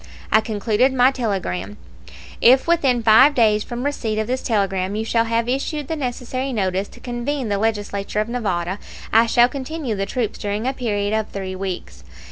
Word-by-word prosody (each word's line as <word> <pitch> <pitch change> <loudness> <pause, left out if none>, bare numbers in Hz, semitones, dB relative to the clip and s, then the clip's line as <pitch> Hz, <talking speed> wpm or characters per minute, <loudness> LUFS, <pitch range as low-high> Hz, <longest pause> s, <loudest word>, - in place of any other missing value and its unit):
I 220 - +5
concluded 220 +3 +1
my 255 0 +5
telegram: 180 - -3 0.6
"If 260 +3 +6
within 270 -8 +2
five 255 +7 +6
days 215 -3 +3
from 240 +1 -5
receipt 230 -7 -2
of 220 - 0
this 255 +3 -2
telegram 195 -3 0
you 220 +1 -2
shall 230 0 +1
have 230 0 0
issued 275 +3 -2
the 325 - -1
necessary 255 -1 -3
notice 195 -3 -1
to - - -16
convene 245 +1 -3
the 200 -1 0
Legislature 205 -2 -2
of 215 - 0
Nevada, 195 -6 -2 0.3
I 225 +1 +6
shall 240 +1 +5
continue 275 0 -4
the 195 -1 -2
troops 235 -1 -3
during 205 +2 -3
a 265 - 0
period 210 -5 -1
of 220 -1 0
three 190 -1 -5
weeks. 185 -1 -6
225 Hz, 180 wpm, -21 LUFS, 205-255 Hz, 0.6 s, If